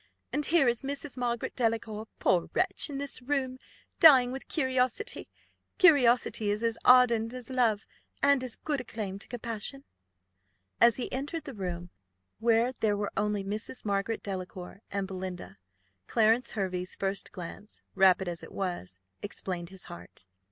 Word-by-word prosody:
And 295 +2 0
here 315 -5 +4
is 235 -1 +2
Mrs. 280 +1 -4
Margaret 240 -2 -2
Delacour, 225 -2 -1
poor 175 -2 +2
wretch, - - +3
in 280 - -4
this 280 -2 0
room, 260 -1 -2 0.4
dying 260 -6 +8
with 265 +1 -6
curiosity. 260 - 0 0.5
Curiosity 250 - +4
is 210 +2 -1
as 230 -1 +1
ardent 245 -2 +5
as 250 0 -6
love, 230 -5 +1 0.4
and 280 -1 +5
has 255 -2 -4
as - - -1
good 290 -4 -2
a - - -9
claim 205 -4 -5
to - - -9
compassion." 235 +3 -4 1.0
As 235 -1 +6
he 255 - -4
entered 290 +5 -3
the 280 -3 -8
room, 175 -4 -5 0.5
where 230 +2 +3
there 210 -2 +1
were 205 0 -2
only 210 -1 0
Mrs. 215 +5 -3
Margaret 200 +2 -1
Delacour 185 0 -6
and 200 -1 -2
Belinda, 185 -2 -7 0.5
Clarence 225 +2 +2
Hervey's 185 -3 -2
first 195 0 -2
glance, 185 +4 -9
rapid 190 -1 +4
as 175 -1 -4
it - - -11
was, 95 - -4 0.2
explained 180 -4 -5
his 190 -1 -7
heart. 85 +2 -11
225 Hz, 155 wpm, -29 LUFS, 195-255 Hz, 1.0 s, dying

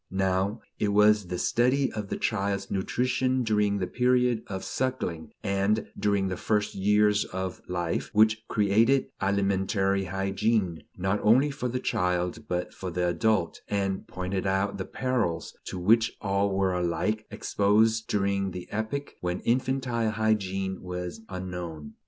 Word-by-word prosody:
Now 95 +2 0 0.2
it 105 - +1
was 105 -1 +4
the 90 0 -3
study 130 +7 +2
of 105 -2 -5
the - - -2
child's 100 -2 -1
nutrition 125 +6 0
during 105 -2 +2
the 95 - -1
period 125 0 +2
of 95 -1 -5
suckling 125 -11 -3
and 100 +2 0
during 100 -2 +1
the 95 -1 -3
first 105 +1 0
years 105 +1 +3
of 95 0 -5
life 85 -2 -2
which 110 +1 +4
created 110 +6 +3
alimentary 95 0 +1
hygiene, 95 -1 0 0.2
not 95 +3 0
only 130 +7 +4
for 140 -3 -3
the 125 +1 -2
child 90 -4 -1
but 90 0 -2
for 95 - -5
the 90 0 0
adult, 85 +1 +1
and 95 -2 -1
pointed 95 +1 -3
out 95 +1 0
the 95 - -2
perils 120 -10 -2
to - - -5
which 115 +6 +3
all 100 0 +1
were 95 -1 +1
alike 90 +5 -1
exposed 110 +2 +2
during 100 -1 0
the 90 -1 -7
epoch 110 +7 -3
when 90 0 -2
infantile 125 -2 0
hygiene 95 -4 -1
was 90 +2 -5
unknown. 90 -5 -6
100 Hz, 145 wpm, -27 LUFS, 95-110 Hz, 0.2 s, was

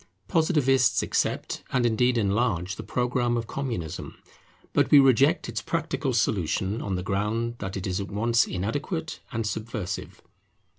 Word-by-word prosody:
Positivists 135 - +3
accept, - - -1
and 125 -1 +2
indeed 120 +2 +2
enlarge, 100 -3 0
the - - -6
programme 125 -1 0
of 115 - -2
Communism; 115 - -4 0.6
but - - +3
we 145 - +8
reject 135 +4 +5
its - - -3
practical 160 -4 -2
solution 100 -2 0
on 100 -2 -2
the 90 - -3
ground 110 +5 -1
that 95 0 -4
it 95 - -4
is 95 +1 -1
at 100 - -6
once 115 +3 +2
inadequate 145 - -3
and 115 -1 -2
subversive. 110 -2 -4
115 Hz, 145 wpm, -26 LUFS, 100-130 Hz, 0.6 s, we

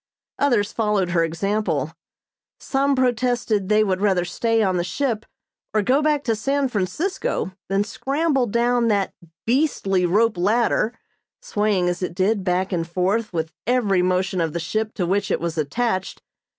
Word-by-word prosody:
Others 235 -8 +2
followed 210 -5 0
her 170 -1 +3
example. 195 +6 -1 0.7
Some 275 0 +1
protested 245 -5 +1
they 215 0 +4
would 190 -2 -1
rather 190 -4 +2
stay 225 +5 +1
on 185 -2 +1
the 175 - 0
ship 225 +3 -2 0.5
or 215 - +3
go 265 +7 +3
back 300 -2 +1
to 230 -3 +1
San 275 +5 0
Francisco 235 - -2 0.2
than 195 +1 +2
scramble 275 +3 0
down 235 +2 +2
that 200 -3 +1 0.3
"beastly 225 - +1
rope 210 +1 +2
ladder" 225 +3 +1 0.4
swaying 210 - 0
as 175 +1 -1
it 180 -2 -3
did 195 +2 +1
back 185 +1 0
and 165 -2 -1
forth 190 +6 0
with 160 -2 -2 0.2
every 220 -7 +2
motion 185 0 0
of 160 -2 -1
the 170 - -2
ship 215 +6 -2
to 180 - -1
which 195 +3 0
it - - +1
was 170 -1 -3
attached. 190 +6 -2
210 Hz, 160 wpm, -22 LUFS, 185-240 Hz, 0.7 s, they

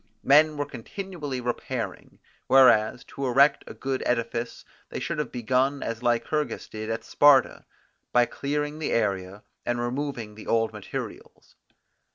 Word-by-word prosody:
Men 150 +2 +5
were 145 - -1
continually 150 - -6
repairing; 120 0 -4 0.3
whereas, 125 -3 +5
to 140 -1 -5
erect 140 +4 +4
a - - -9
good 135 -1 -3
edifice, 115 0 -2 0.2
they - - -5
should - - -3
have 150 - -2
begun 130 +4 0
as 115 0 -4
Lycurgus 120 +3 -1
did 110 0 -6
at 115 0 -3
Sparta, 145 -1 +4 0.5
by 120 0 +5
clearing 150 +3 -3
the 155 - -2
area, 100 -2 -1 0.2
and 120 0 -1
removing 120 -3 -3
the 110 - -12
old 115 -1 +1
materials. - - -8
125 Hz, 140 wpm, -26 LUFS, 115-145 Hz, 0.5 s, Men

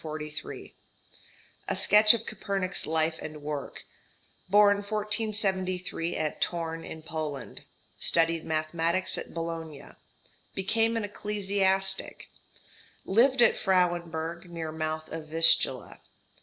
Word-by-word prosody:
A - - -1
sketch 210 +2 +7
of 225 0 -6
Copernik's 195 -2 -3
life 160 0 0
and 155 -1 -8
work. 150 -1 -5 0.7
Born 205 +1 +5
1473 200 -4 -2
at 155 -1 -1
Thorn 165 -1 -3
in 160 0 -9
Poland. 155 -3 -6 0.4
Studied 165 -1 +2
mathematics 165 +3 -1
at - - -8
Bologna. 165 -3 -6 0.7
Became 225 +4 +1
an 225 - -2
ecclesiastic. 195 -2 -1 0.8
Lived 245 +5 +4
at - - +4
Frauenburg 170 -3 0
near 165 -2 -5
mouth 155 0 -4
of 160 -1 -6
Vistula. 165 +1 +4
175 Hz, 100 wpm, -28 LUFS, 160-205 Hz, 0.8 s, sketch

